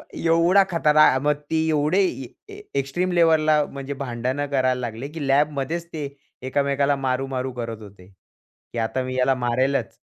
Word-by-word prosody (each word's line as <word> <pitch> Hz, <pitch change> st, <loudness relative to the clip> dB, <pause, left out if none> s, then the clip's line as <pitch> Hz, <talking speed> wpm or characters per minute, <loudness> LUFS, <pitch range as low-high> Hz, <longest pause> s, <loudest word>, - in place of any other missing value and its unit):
एवढा 170 Hz, +4 st, +4 dB
खतरा 155 Hz, -3 st, +4 dB, 0.2 s
मग 150 Hz, 0 st, +1 dB
ते 160 Hz, -, 0 dB
एवढे 155 Hz, +4 st, +2 dB
ए 135 Hz, -8 st, -4 dB, 0.3 s
ए 405 Hz, -, -10 dB, 0.2 s
एक्स्ट्रीम 175 Hz, +7 st, -2 dB
लेव्हलला 155 Hz, -3 st, +4 dB
म्हणजे 140 Hz, 0 st, -6 dB
भांडण 130 Hz, +3 st, -2 dB
करायला 130 Hz, -2 st, +2 dB
लागले, 120 Hz, +2 st, -5 dB
की 150 Hz, -1 st, -6 dB
लॅबमध्येच 145 Hz, +3 st, 0 dB
ते 150 Hz, -3 st, -3 dB, 0.4 s
एकमेकाला 140 Hz, +1 st, +1 dB
मारू-मारू 130 Hz, -1 st, -2 dB
करत 115 Hz, -2 st, -6 dB
होते. 100 Hz, -3 st, -14 dB
की 95 Hz, +4 st, -18 dB
आता 115 Hz, +3 st, -1 dB
मी 130 Hz, 0 st, -5 dB
याला 130 Hz, +1 st, +3 dB
मारेलच. 130 Hz, +3 st, 0 dB
140 Hz, 150 wpm, -23 LUFS, 130-155 Hz, 0.4 s, एवढा